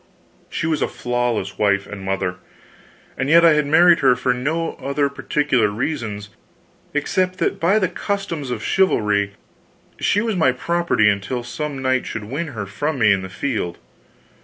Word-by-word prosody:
She - - -3
was 160 -1 0
a - - +2
flawless 120 -6 -2
wife 100 -1 +2
and 105 -2 -8
mother; 95 -1 -2 0.8
and 135 +1 0
yet 170 +2 +7
I 165 - +7
had 150 -1 +1
married 170 +3 +6
her 130 -3 +4
for 125 +1 0
no 160 +7 -2
other 140 +1 0
particular 140 -4 +1
reasons, 105 -2 -3 0.6
except 185 +5 0
that - - -1
by 185 +6 +3
the 190 -4 +2
customs 180 -6 -3
of 115 -3 -4
chivalry 105 - +1 0.7
she 205 - +2
was 225 -1 -1
my 160 -8 +3
property 170 -5 +1
until 105 +5 0
some 135 +4 -5
knight 130 -1 +1
should 110 - -5
win 140 +10 -4
her 110 -8 -5
from 145 +10 -3
me 110 -4 +5
in 95 - -1
the 95 - -7
field. 95 -3 -3
130 Hz, 165 wpm, -21 LUFS, 105-160 Hz, 0.8 s, yet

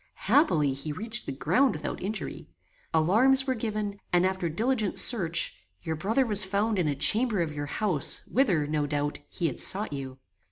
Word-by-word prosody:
Happily, 185 - +3
he 140 +3 -6
reached 220 +8 -2
the - - -3
ground 190 - +1
without - - -5
injury. 210 +3 -6 0.4
Alarms 230 +12 +4
were 260 - 0
given, 215 -3 -4
and 175 +1 +3
after 185 -2 -1
diligent 220 +4 -1
search, 170 -9 +3 0.3
your 160 - -3
brother 220 - 0
was 210 -3 +2
found 200 +2 -1
in 170 - 0
a 145 - -1
chamber 220 - +3
of 165 -3 -2
your 145 -1 -5
house, 180 -4 0
whither, 195 - +1
no 150 0 -2
doubt, 145 0 -3
he 175 - -4
had 145 - -2
sought 200 -4 +3
you. 135 -2 -7
190 Hz, 175 wpm, -27 LUFS, 155-220 Hz, 0.4 s, Alarms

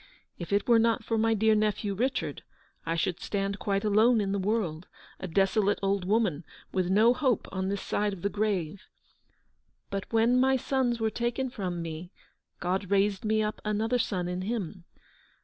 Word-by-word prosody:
If 170 - -6
it 200 0 +1
were 235 -2 +6
not 230 +1 +2
for 225 - -1
my 225 0 +3
dear 220 +1 +3
nephew, 210 -1 0
Kichard, 255 +6 -1 0.5
I 165 - 0
should 170 +1 -1
stand 200 0 -2
quite 200 -1 -1
alone 220 +3 +4
in 200 -2 -1
the 200 - 0
world, 185 -5 -1 0.3
a 190 - -5
desolate 195 +3 +2
old 195 -1 0
woman, 195 -6 +1 0.3
with 185 -2 0
no 220 +5 +5
hope 255 -3 0
on 190 0 -2
this 200 0 -3
side 210 0 0
of 195 -4 -8
the - - +2
grave. 200 -4 -2 1.0
But 195 -1 -4
when 230 +2 +3
my 265 +1 +4
sons 255 -2 0
were 220 -1 0
taken 240 +3 -2
from 180 -7 -4
me, 165 +2 -7 0.5
God 185 +2 -2
raised 200 0 +2
me 215 0 +2
up 210 0 -3
another 220 +3 0
son 180 -6 -1
in 180 +1 -3
him. 190 -4 -4
205 Hz, 180 wpm, -28 LUFS, 190-225 Hz, 1.0 s, were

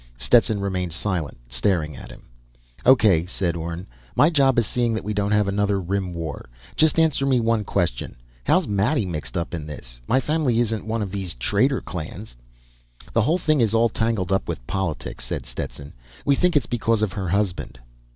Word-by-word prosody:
Stetson 110 - +3
remained 90 -4 -2
silent, 85 -5 -1
staring 75 +4 0
at - - -10
him. - - -13 0.6
"O.K.," 105 -10 +5
said 90 -2 -1
Orne. 85 +2 -5 0.3
"My 155 - +5
job 135 -5 +3
is 120 - +4
seeing 120 -1 0
that 110 - -3
we 105 - -2
don't 100 0 0
have 105 -1 +3
another 100 0 +1
Rim 95 0 -2
War. 80 -7 -6 0.3
Just 155 0 +3
answer 160 -4 +3
me 135 -2 +3
one 115 -2 +1
question: 85 -13 -1 0.3
How's - - +2
Maddie 105 +5 +1
mixed 85 +1 -4
up 85 +1 -3
in 80 -3 -4
this? - - -9
My 130 - +3
family 140 -4 +1
isn't 110 -2 -1
one 110 0 -1
of 95 - -5
these 95 -4 -3
traitor 115 - +1
clans." 85 - -7 0.8
"This 115 - +3
whole 160 +9 +2
thing 155 -6 +2
is 115 -1 +2
all 115 +1 +4
tangled 110 -6 -1
up 95 - +1
with - - -5
politics," 95 -3 -3
said - - -4
Stetson. 70 0 -6 0.3
"We 140 - +4
think 175 +2 +3
it's 140 - +1
because 115 -2 0
of 100 -3 -1
her 95 -3 -3
husband." 95 -8 -1
100 Hz, 190 wpm, -23 LUFS, 85-115 Hz, 0.8 s, O.K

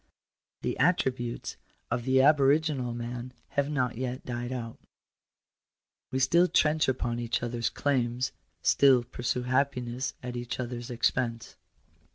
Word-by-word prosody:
The - - -2
attributes 130 -9 0 0.3
of 120 0 -1
the 130 0 +4
aboriginal 145 -2 +3
man 120 +1 -5 0.2
have 140 0 0
not 125 -5 -1
yet 130 0 -4
died 120 0 -4
out 115 -3 -5 1.3
We 130 - -2
still 170 +7 +4
trench 155 -2 +3
upon 120 -2 -1
each 120 0 -1
other's 120 -1 -1
claims 125 -3 0 0.2
— - - -46
still 135 -3 +5
pursue 125 0 -2
happiness 125 -1 -1
at 125 0 -5
each 120 +1 -4
other 125 -1 -3
s 120 - -8
expense. 120 -1 -1
125 Hz, 135 wpm, -29 LUFS, 120-135 Hz, 1.3 s, still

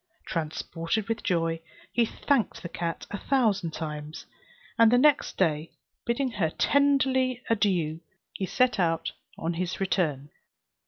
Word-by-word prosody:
Transported 165 +5 -2
with 225 0 -2
joy, 165 -2 0 0.3
he 235 - +3
thanked 275 -2 0
the 170 - -5
cat 170 -1 -4
a 205 - -4
thousand 220 -10 +1
times, 150 -1 -6 0.5
and 230 -1 +7
the 245 - +6
next 290 +3 +3
day, 160 -3 +1 0.4
bidding 250 +2 0
her 195 -8 0
tenderly 260 - +2
adieu, 180 -8 +1 0.3
he 190 - -3
set 250 -1 +2
out 165 -2 +1 0.3
on 165 +1 -2
his 175 +1 -3
return. 150 -7 0
185 Hz, 130 wpm, -27 LUFS, 165-240 Hz, 0.5 s, and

